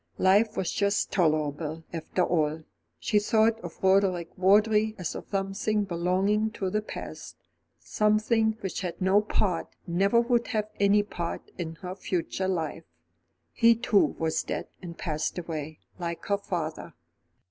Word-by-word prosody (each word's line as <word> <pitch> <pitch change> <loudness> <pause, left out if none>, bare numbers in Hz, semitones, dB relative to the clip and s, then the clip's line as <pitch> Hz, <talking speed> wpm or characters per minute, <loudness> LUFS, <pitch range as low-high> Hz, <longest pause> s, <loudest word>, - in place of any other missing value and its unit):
Life 210 +4 +3
was 185 - 0
just 200 0 0
tolerable, 155 -2 0
after 170 +2 -1
all. 160 -2 0 0.3
She 210 - +2
thought 220 +1 +2
of - - -10
Roderick 190 -3 +2
Vawdrey 210 +3 +4
as 180 -4 -3
of - - -8
something 195 +2 0
belonging 190 +4 +1
to 190 -4 -3
the 215 - 0
past; 215 - -8 0.4
something 220 +1 +1
which 190 0 -3
had 180 -3 -4
no 190 +2 +4
part, 195 -4 -1 0.2
never 195 +6 +3
would 235 0 +1
have 215 -2 -2
any 200 +1 +4
part, 170 -4 -5
in 165 -2 -4
her 180 - -4
future 185 0 -2
life. 165 -3 -2 0.7
He 230 -1 +5
too 225 -3 +2
was 160 -1 0
dead - - -4
and 170 -2 -8
passed 155 -1 -2
away, 155 -3 -5 0.2
like 170 -1 -4
her 200 - +1
father. 165 -5 -4
190 Hz, 145 wpm, -27 LUFS, 170-210 Hz, 0.7 s, He